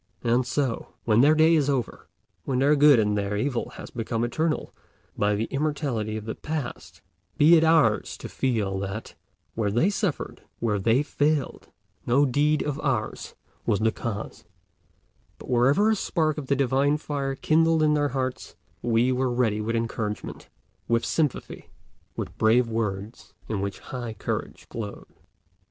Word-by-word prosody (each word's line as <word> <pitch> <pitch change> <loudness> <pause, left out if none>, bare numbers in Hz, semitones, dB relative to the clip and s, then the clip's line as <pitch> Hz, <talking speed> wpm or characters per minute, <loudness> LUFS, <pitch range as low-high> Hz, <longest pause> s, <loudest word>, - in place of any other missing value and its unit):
And 120 +1 +2
so, 130 -3 -2
when 110 0 +4
their 150 +3 +5
day 160 +1 +5
is 145 -3 +2
over, 130 -5 -2 0.4
when 130 - -1
their 140 +3 +4
good 145 -2 +7
and 105 -2 +2
their 100 0 -1
evil 125 +2 -1
have - - -10
become 115 0 -2
eternal 155 +6 -1 0.4
by 105 0 +1
the 105 - -1
immortality 135 -7 -1
of 110 - -7
the 110 - -3
past, 150 -5 -6 0.3
be 160 +4 +7
it 160 - +5
ours 160 -1 +3
to - - -7
feel 105 -7 -1
that, 100 +3 -5 0.4
where 110 -2 0
they 120 - +2
suffered, 200 -6 -3 0.2
where 105 -3 0
they 115 +8 +3
failed, 150 -1 -1 0.4
no 135 +4 +4
deed 145 +3 +2
of 145 0 -3
ours 120 -8 -2 0.3
was 100 - +2
the 110 +1 +2
cause; 110 -2 -5 0.9
but - - -9
wherever 140 - +4
a - - +3
spark 155 -6 0
of 140 - -7
the 140 - +2
divine 140 +2 +2
fire 140 -3 -3
kindled 160 +2 +3
in 150 -1 +4
their 145 -1 +1
hearts, 130 -1 -4 0.3
we 120 +2 +2
were 130 0 +1
ready 120 -4 +1
with 115 +2 -2
encouragement, 110 -2 -4 0.4
with 115 0 +1
sympathy, 150 +2 -2 0.5
with - - -5
brave 115 +2 +4
words 110 -1 -4
in 105 -3 -2
which 100 0 -3
high 120 -3 -6
courage - - -4
glowed. 105 -3 -7
125 Hz, 160 wpm, -25 LUFS, 110-145 Hz, 0.9 s, good